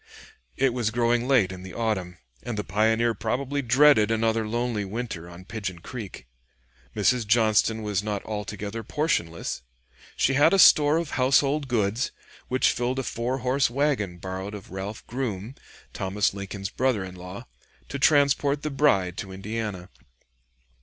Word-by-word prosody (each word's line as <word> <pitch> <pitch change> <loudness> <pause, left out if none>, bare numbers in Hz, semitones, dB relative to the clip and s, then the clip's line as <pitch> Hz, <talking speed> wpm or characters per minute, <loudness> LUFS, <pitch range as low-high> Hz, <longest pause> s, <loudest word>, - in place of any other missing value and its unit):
It 135 -3 +2
was 120 -3 0
growing 120 +1 +1
late 120 -9 +3
in 95 -1 -8
the 95 0 -9
autumn, 95 -6 -2 0.2
and 120 -3 -5
the 105 - -1
pioneer 110 +4 +2
probably 130 +7 -2
dreaded 125 -3 +5
another 115 0 +1
lonely 120 -1 -1
winter 100 -4 -5
on 90 +1 -12
Pigeon 100 -4 -5
Creek. 100 - -8 0.7
Mrs. 110 +2 +2
Johnston 110 0 +3
was 105 -2 -1
not 105 -2 -4
altogether 105 +1 -5
portionless. 100 - -2 0.5
She 135 - +2
had 145 +8 +5
a - - +3
store 150 -4 +7
of 165 -2 -3
household 140 +2 +2
goods 115 0 0 0.4
which 130 +1 +2
filled 125 +2 -2
a 135 - -1
four 120 +2 -2
horse 130 +1 +2
wagon 125 -9 0
borrowed 95 +3 -5
of 100 - -11
Ralph 95 +3 -6
Grume, 120 -3 -4 0.4
Thomas 95 +1 0
Lincoln's 100 0 -6
brother 125 -6 0
in 95 -1 -8
law, 90 +6 -9 0.4
to 140 - -4
transport 145 0 +3
the 150 - -2
bride 100 - +2
to 95 - -6
Indiana. 100 -1 -5
110 Hz, 150 wpm, -26 LUFS, 100-130 Hz, 0.7 s, store